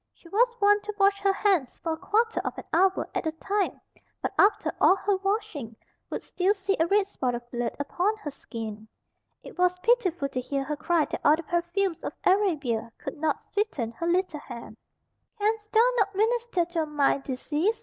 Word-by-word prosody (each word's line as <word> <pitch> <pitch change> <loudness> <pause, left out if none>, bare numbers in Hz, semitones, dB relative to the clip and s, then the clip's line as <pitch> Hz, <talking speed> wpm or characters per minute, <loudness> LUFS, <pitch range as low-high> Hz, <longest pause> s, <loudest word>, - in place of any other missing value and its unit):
She - - -18
was 475 +5 +3
wont 410 0 +5
to 425 - -4
wash 395 0 +4
her 395 -1 +3
hands 385 -9 +1
for 330 - -3
a - - -5
quarter 450 +6 +1
of - - -4
an - - -6
hour 375 +3 +3
at - - -1
a - - +1
time; 395 +4 -1 0.4
but - - -3
after 405 +1 +3
all 375 - +7
her 400 +1 0
washing, 390 - -2 0.3
would - - -4
still 380 +3 +1
see 395 0 0
a 325 - +3
red 405 +2 +3
spot 255 -11 -2
of 240 0 -7
blood 240 -1 -2
upon 360 +9 0
her 310 -9 -6
skin. 220 -5 -7 0.6
It - - -12
was 360 0 +3
pitiful 365 - +2
to 255 -2 -3
hear 275 +2 -2
her 300 +2 -3
cry 315 +1 +1
that - - -5
all 300 - +6
the 335 - -7
perfumes 345 +2 -1
of - - -5
Arabia 300 - +1
could 315 - -7
not 310 0 0
sweeten 405 - -1
her 335 +9 -4
little 350 -3 +1
hand. 235 -5 -9 0.6
"Canst 425 0 -1
thou 455 +2 +5
not 400 -3 +1
minister 450 -3 +1
to 340 -1 -2
a - - 0
mind 290 -2 +2
diseased?" 300 - -1
360 Hz, 200 wpm, -27 LUFS, 295-410 Hz, 0.6 s, all